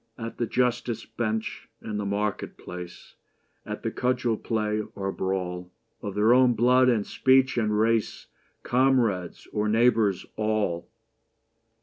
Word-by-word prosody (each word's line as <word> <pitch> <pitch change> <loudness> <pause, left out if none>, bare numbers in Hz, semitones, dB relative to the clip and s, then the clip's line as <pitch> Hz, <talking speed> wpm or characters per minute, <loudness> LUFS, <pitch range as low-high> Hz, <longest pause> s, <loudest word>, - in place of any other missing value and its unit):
At 115 -1 -7
the 120 - 0
justice 120 -2 0
bench 110 -1 -3
and 105 -2 -5
the 105 - -3
market 105 +1 -2
place, 90 0 -9 0.5
At - - -5
the - - -1
cudgel 125 -2 0
play 105 -1 -1
or 95 0 -2
brawl, 90 -2 -3 0.3
Of 100 -1 -5
their 110 +3 +4
own 125 -1 +5
blood 125 +3 +4
and 110 -4 +1
speech 130 0 +3
and 105 -3 +1
race, 115 0 +1 0.4
Comrades 120 -8 +1
or 105 0 0
neighbours 110 -4 +3
all 110 -5 -1
110 Hz, 130 wpm, -26 LUFS, 100-120 Hz, 0.5 s, own